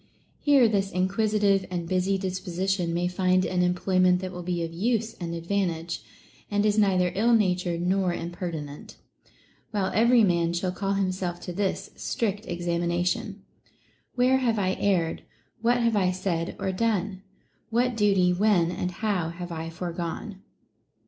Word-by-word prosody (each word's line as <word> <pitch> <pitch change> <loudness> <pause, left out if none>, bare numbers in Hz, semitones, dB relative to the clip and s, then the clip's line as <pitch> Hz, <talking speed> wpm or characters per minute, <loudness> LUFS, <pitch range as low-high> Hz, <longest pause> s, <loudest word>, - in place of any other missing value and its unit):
Here 280 -5 +5
this 195 -2 0
inquisitive 195 +1 +1
and 175 -2 -3
busy 185 +2 +1
disposition 185 -1 -2
may 175 +1 0
find 185 0 +2
an 180 -1 0
employment 180 0 +3
that 185 -1 -4
will 180 -1 -6
be 175 -1 -2
of 165 0 -5
use 225 +4 0
and 170 -1 -4
advantage, 170 -2 -2 0.5
and 205 0 +1
is 210 -1 +3
neither 185 -4 +3
ill 230 +5 +3
natured 180 -5 +1
nor 185 0 +1
imperti 170 -2 -4
nent; 145 0 -11 0.7
while 200 -4 -1
every 235 +1 +5
man 170 -3 +2
shall 180 +1 -1
call 195 +2 -2
himself 185 -2 -1
to 180 - -6
this 195 +1 -2
strict 210 -1 -2
examination: 175 +3 -1 0.7
Where 255 +1 +4
have 235 -4 +1
I 190 -2 +1
err'd 175 -5 +1 0.4
1 235 +1 +3
What 245 - 0
have 230 -1 +2
I 190 -3 +3
said, 180 -2 -2
or 190 - -2
done 200 -2 -1 0.5
1 235 +1 +2
What - - -8
duty, 195 -4 +3
when, 180 -3 +3
and 180 - -2
how 180 -3 -1
have 175 +1 -7
I 165 0 -4
foregone 175 +4 -5
185 Hz, 155 wpm, -26 LUFS, 175-205 Hz, 0.7 s, Here